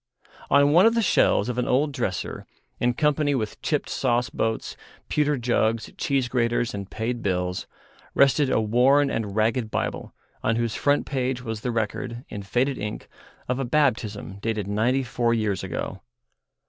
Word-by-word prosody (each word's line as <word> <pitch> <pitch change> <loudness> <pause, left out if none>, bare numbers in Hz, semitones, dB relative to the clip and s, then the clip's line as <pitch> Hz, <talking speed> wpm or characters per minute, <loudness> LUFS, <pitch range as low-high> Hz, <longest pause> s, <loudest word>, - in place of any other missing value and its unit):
On 140 +1 +5
one 180 +7 +7
of 230 - +2
the 230 - +3
shelves 105 - +3
of 125 0 -2
an 125 - 0
old 145 +4 +2
dresser, 115 -9 -3 0.3
in 120 0 +1
company 150 -1 +2
with 110 -5 -3
chipped 150 -2 -1
sauce 120 -2 0
boats, 110 0 -2 0.3
pewter 150 -1 +1
jugs, 115 -2 0
cheese 135 -3 0
graters, 120 -1 0
and 100 -1 -6
paid 120 +2 -3
bills, 90 -2 -1 0.5
rested 140 0 +4
a - - +2
worn 130 +6 +3
and 105 -3 -3
ragged 110 +1 +1
Bible, - - -3 0.3
on 110 - +1
whose 115 -1 -1
front 145 +4 +1
page 130 -2 -2
was 110 -3 -4
the 125 - -2
record, 115 +2 -3
in 105 - -6
faded 125 +7 0
ink, 105 +1 -5 0.4
of 125 +1 -1
a - - 0
baptism 120 -8 0
dated 110 -3 -1
ninety 115 +6 +1
four 120 -1 0
years 105 -4 -1
ago. - - -4
120 Hz, 165 wpm, -25 LUFS, 110-135 Hz, 0.5 s, one